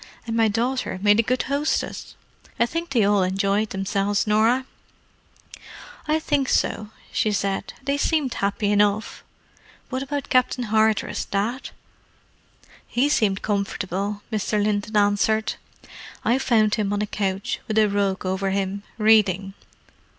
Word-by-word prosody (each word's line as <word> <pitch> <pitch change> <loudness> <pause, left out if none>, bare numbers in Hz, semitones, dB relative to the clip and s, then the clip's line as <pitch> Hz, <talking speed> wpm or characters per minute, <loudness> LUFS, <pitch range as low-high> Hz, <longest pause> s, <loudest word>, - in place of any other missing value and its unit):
"And 230 -1 -3
my 225 -1 +4
daughter 235 +1 -1
made 205 +1 +5
a - - +7
good 250 +3 0
hostess. 285 +3 -2 0.4
I 235 - +5
think 335 +7 -4
they 240 -5 +2
all 200 0 +3
enjoyed 195 +3 +1
themselves, 195 +1 0
Norah." 225 +5 +2 1.4
"I 305 +1 +2
think 290 -4 0
so," 210 -1 0 0.2
said 200 -2 0
she. - - -10
"They 280 +1 0
seemed 285 -4 0
happy 200 0 -1
enough. 205 +1 +1 0.7
What 260 0 -3
about 285 +1 -4
Captain 255 0 +2
Hardress, 220 -1 +1
Dad?" 220 +7 -2 1.2
"He 265 +4 +1
seemed 200 -8 +1
comfortable," 200 0 -2
Mr. 210 0 0
Linton 210 +1 0
answered. 210 +2 +2 0.7
"I 245 +3 +3
found 220 -5 +2
him 205 -3 0
on 205 0 0
a - - 0
couch, 195 -2 -2
with 220 - -2
a 215 -1 +5
rug 200 -2 -1
over 190 +1 -1
him, 195 +1 -2 0.2
reading. 205 -3 +3
210 Hz, 135 wpm, -23 LUFS, 200-240 Hz, 1.4 s, a